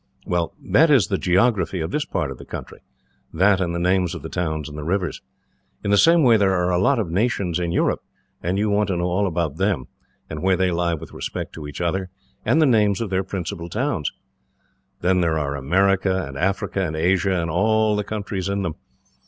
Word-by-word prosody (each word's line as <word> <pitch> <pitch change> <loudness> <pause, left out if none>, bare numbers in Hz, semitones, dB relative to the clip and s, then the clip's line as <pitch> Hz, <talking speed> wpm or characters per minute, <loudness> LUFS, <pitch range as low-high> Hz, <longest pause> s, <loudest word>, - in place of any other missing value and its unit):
Well, 85 -1 -1
that 160 +3 +4
is 130 - +4
the 95 - 0
geography 95 +1 +2
of 80 +2 -3
this 150 - -1
part 75 - -2
of 65 - -9
the - - -9
country - - -8 0.5
that 95 +3 +3
and 85 -2 -1
the - - -1
names 90 0 +1
of 85 - -8
the 80 - -6
towns 80 -4 -2
and 75 0 -7
rivers. 90 -1 -1 0.6
In 100 - -1
the - - +6
same 165 +6 +5
way, 120 -4 +6
there 95 -2 +2
are 90 0 +1
a 90 - +2
lot 140 +7 +3
of 100 -8 -2
nations 95 -3 0
in 85 -1 -1
Europe, - - +1 0.4
and 90 +3 -1
you 105 +1 +1
want 105 0 +2
to 95 -3 -1
know 85 - -1
all 90 +3 +1
about 80 -4 -2
them, 95 -8 0 0.4
and - - -6
where 95 0 +2
they 95 0 +1
lie 85 0 0
with 75 - -10
respect - - -5
to 75 -2 -7
each 75 - -7
other, 90 +2 -1 0.3
and 160 - +2
the 155 - +5
names 105 -6 +3
of 110 -4 -3
their 95 0 +1
principal 85 -3 -5
towns. 110 - -1 0.9
Then 90 +1 +2
there 80 -2 +1
are 70 -2 -2
America, 95 +5 +1
and 70 - -9
Africa, 95 +4 -1
and 80 -3 -3
Asia, 95 +3 +1
and 85 -1 -2
all 110 +4 +2
the 105 - -1
countries 100 -2 -4
in 100 0 -1
them. 85 -4 -2
95 Hz, 220 wpm, -22 LUFS, 85-100 Hz, 0.9 s, the